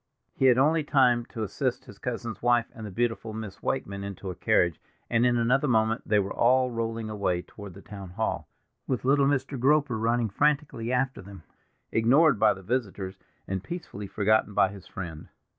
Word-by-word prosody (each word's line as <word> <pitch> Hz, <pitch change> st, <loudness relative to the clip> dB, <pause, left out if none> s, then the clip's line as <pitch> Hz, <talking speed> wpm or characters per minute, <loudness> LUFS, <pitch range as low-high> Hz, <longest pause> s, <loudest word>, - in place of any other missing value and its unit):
He 135 Hz, -, 0 dB
had 125 Hz, -2 st, +6 dB
only 155 Hz, +4 st, +3 dB
time 125 Hz, -5 st, +3 dB
to 110 Hz, -, -5 dB
assist 100 Hz, -, -2 dB
his -, -, -13 dB
cousin's -, -, -4 dB
wife 120 Hz, -1 st, +3 dB
and 110 Hz, -4 st, -8 dB
the -, -, -6 dB
beautiful 115 Hz, +1 st, -2 dB
Miss 110 Hz, -3 st, -7 dB
Wakeman 100 Hz, -7 st, -3 dB
into 100 Hz, -1 st, -6 dB
a -, -, -8 dB
carriage, 85 Hz, -2 st, +2 dB, 0.3 s
and 120 Hz, +1 st, +4 dB
in 120 Hz, -1 st, +2 dB
another 125 Hz, +5 st, +2 dB
moment 110 Hz, -2 st, +2 dB
they 105 Hz, -, +3 dB
were 100 Hz, -1 st, 0 dB
all 125 Hz, +1 st, +3 dB
rolling 115 Hz, -1 st, -3 dB
away 100 Hz, -5 st, -1 dB
toward 100 Hz, -4 st, -11 dB
the 100 Hz, -, -12 dB
town 100 Hz, -3 st, -9 dB
hall, 110 Hz, +5 st, -2 dB, 0.4 s
with 125 Hz, -2 st, -2 dB
little 140 Hz, +1 st, +4 dB
Mr. 135 Hz, -1 st, -1 dB
Groper 140 Hz, -2 st, +2 dB
running 115 Hz, 0 st, +1 dB
frantically 140 Hz, -3 st, 0 dB
after 130 Hz, -1 st, 0 dB
them, 95 Hz, -3 st, -12 dB, 0.5 s
ignored 125 Hz, +3 st, +4 dB
by -, -, +4 dB
the 95 Hz, -, -12 dB
visitors, 100 Hz, -4 st, -3 dB, 0.3 s
and 95 Hz, -1 st, -3 dB
peacefully 105 Hz, -, -7 dB
forgotten 105 Hz, 0 st, +1 dB
by 85 Hz, -, +4 dB
his 95 Hz, -2 st, -11 dB
friend. 85 Hz, -5 st, -7 dB
115 Hz, 185 wpm, -27 LUFS, 100-130 Hz, 0.5 s, had